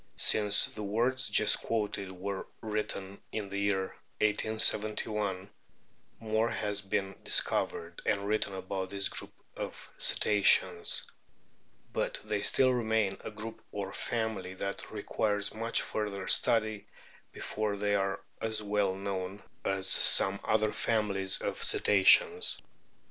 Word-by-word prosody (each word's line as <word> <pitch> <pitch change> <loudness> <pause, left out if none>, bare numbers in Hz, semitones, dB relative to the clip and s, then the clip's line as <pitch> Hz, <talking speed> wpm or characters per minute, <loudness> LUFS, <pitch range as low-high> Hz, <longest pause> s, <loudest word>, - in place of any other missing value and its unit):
Since 105 -1 +4
the 110 - -8
words 120 +6 0
just 110 - +4
quoted 105 -4 -3
were 95 +1 -6
written 105 -3 -4
(in 105 -2 -4
the 100 0 -4
year 100 -1 -1 0.2
1871) 105 -2 +1 0.7
more 110 +1 0
has 105 -2 -2
been 95 0 -2
dis - - +6
covered 85 0 -4
and 100 -2 -1
written 105 -1 -1
about 95 0 -5
this 100 0 -1
group - - -7 0.2
of - - -7
Cetaceans; 105 -2 +3 0.9
but - - -2
they 105 -1 -2
still 130 +3 +4
remain 110 -5 0
a - - -5
group 110 +1 -9
or 100 -1 -5
family 110 -5 -3
that 100 +1 -5
requires 105 -1 -2
much 115 +1 0
further 100 -3 -4
study 110 -2 +2 0.4
before 105 -1 -3
they 105 0 -1
are 95 -1 -1 0.2
as 110 -1 -1
well 100 -2 0
known 95 0 -5 0.2
as 95 -1 0
some 95 +1 +5
other 110 0 +1
families 100 -4 +1
of - - -3
Cetaceans. 100 -2 +5
105 Hz, 125 wpm, -30 LUFS, 95-110 Hz, 0.9 s, dis